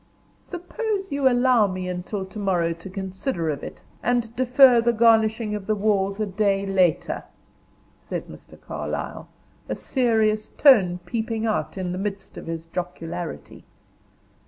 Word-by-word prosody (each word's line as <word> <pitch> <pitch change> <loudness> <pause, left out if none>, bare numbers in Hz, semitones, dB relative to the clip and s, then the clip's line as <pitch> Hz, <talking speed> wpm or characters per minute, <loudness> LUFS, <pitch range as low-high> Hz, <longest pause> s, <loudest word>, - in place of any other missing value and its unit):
'" - - -35
"Suppose 390 +2 -4
you 280 -2 +3
allow 245 -3 +4
me 185 -1 -4
until 185 +2 -4
to 200 +3 -9
morrow 175 -4 +1
to 165 +3 -11
consider 190 - -3
of 140 - -5
it, - - -9 0.2
and 235 -1 0
defer 255 -1 +6
the 235 +1 +2
garnishing 220 -1 +3
of 205 -2 -5
the 215 - +2
walls 200 -1 0
a 215 - +1
day 200 0 0
later," 185 -3 +1 0.8
said - - -5
Mr. - - -14
Carlyle, - - -5 0.4
a - - -1
serious 220 -4 +1
tone 195 -11 +6
peeping 225 +2 -2
out 215 -2 -1
in 185 -2 -3
the 180 - -3
midst 195 -1 -5
of - - -9
his 165 0 -5
jocularity. 170 - -6
210 Hz, 150 wpm, -24 LUFS, 185-235 Hz, 0.8 s, defer